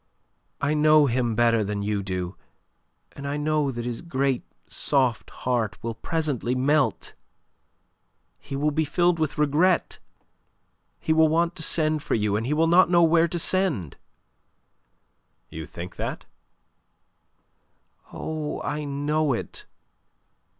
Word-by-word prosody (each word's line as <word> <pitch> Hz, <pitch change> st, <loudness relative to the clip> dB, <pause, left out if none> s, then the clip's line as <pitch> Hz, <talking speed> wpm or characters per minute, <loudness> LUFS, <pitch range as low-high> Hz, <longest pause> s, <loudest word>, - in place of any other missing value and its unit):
"I 145 Hz, +2 st, 0 dB
know 155 Hz, 0 st, +5 dB
him 120 Hz, -3 st, 0 dB
better 115 Hz, -1 st, +3 dB
than 100 Hz, 0 st, -3 dB
you 105 Hz, 0 st, -1 dB
do, 90 Hz, -1 st, -4 dB, 0.8 s
and 140 Hz, 0 st, -8 dB
I 145 Hz, +1 st, -2 dB
know 150 Hz, -1 st, 0 dB
that 120 Hz, -2 st, -5 dB
his 120 Hz, -1 st, -4 dB
great 135 Hz, -6 st, -1 dB, 0.3 s
soft 130 Hz, -5 st, 0 dB
heart 115 Hz, -6 st, -2 dB
will 115 Hz, 0 st, -3 dB
presently 135 Hz, -1 st, -2 dB
melt. 145 Hz, +3 st, +1 dB, 1.3 s
He 140 Hz, -, -7 dB
will 150 Hz, +2 st, +1 dB
be 155 Hz, +2 st, +1 dB
filled 175 Hz, +3 st, +1 dB
with 155 Hz, -2 st, -1 dB
regret. 150 Hz, +5 st, +2 dB, 1.0 s
He 160 Hz, -, 0 dB
will 160 Hz, 0 st, +5 dB
want 170 Hz, +3 st, +1 dB
to -, -, -6 dB
send 155 Hz, -2 st, +1 dB
for -, -, -1 dB
you, 105 Hz, -2 st, 0 dB
and 110 Hz, +3 st, -2 dB
he 145 Hz, -, 0 dB
will 160 Hz, +2 st, +3 dB
not 175 Hz, +3 st, +5 dB
know 170 Hz, -1 st, +5 dB
where 165 Hz, 0 st, +4 dB
to 175 Hz, -, -4 dB
send." 165 Hz, -, 0 dB, 1.6 s
"You 80 Hz, -1 st, -7 dB
think 85 Hz, +3 st, -9 dB
that?" -, -, -4 dB, 1.9 s
"Oh, 155 Hz, -1 st, -4 dB
I 150 Hz, +1 st, -3 dB
know 145 Hz, +1 st, 0 dB
it! 115 Hz, -, -6 dB
145 Hz, 135 wpm, -25 LUFS, 120-155 Hz, 1.9 s, know